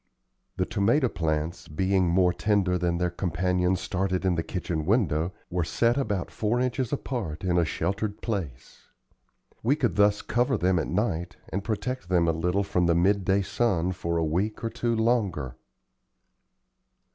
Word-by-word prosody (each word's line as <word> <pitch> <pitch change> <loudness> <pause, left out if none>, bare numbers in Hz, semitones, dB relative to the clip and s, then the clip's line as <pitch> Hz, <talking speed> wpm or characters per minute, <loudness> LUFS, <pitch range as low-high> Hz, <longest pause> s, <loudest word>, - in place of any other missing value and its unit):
The 95 - +1
tomato 115 +7 +2
plants, 80 -2 -2
being 95 +4 +1
more 90 0 +3
tender 100 -3 +1
than 85 -1 0
their 90 0 0
companions 90 +1 0
started 95 0 -1
in 95 - +3
the 85 - 0
kitchen 85 -2 -3
window, 90 - +2 0.2
were 90 -1 0
set 115 +8 +1
about 105 -10 -2
four 110 +3 0
inches 125 -1 -1
apart 115 - -3
in 90 -1 +2
a 85 - +3
sheltered 100 +6 -2
place. 85 - -5 0.7
We 130 +6 +2
could 130 -8 -1
thus 105 0 +3
cover 120 +2 +1
them 90 -1 +2
at 80 - -2
night 90 -3 -1
and 95 +3 -3
protect 110 -1 -3
them 85 -2 +3
a - - +4
little 90 +5 0
from 90 -3 +1
the 85 - +3
midday 95 +2 +2
sun 95 -5 0
for 85 -2 -2
a 80 - +1
week 95 +9 -1
or 115 - -1
two 120 -1 -1
longer. 105 - 0
95 Hz, 160 wpm, -27 LUFS, 85-105 Hz, 0.7 s, a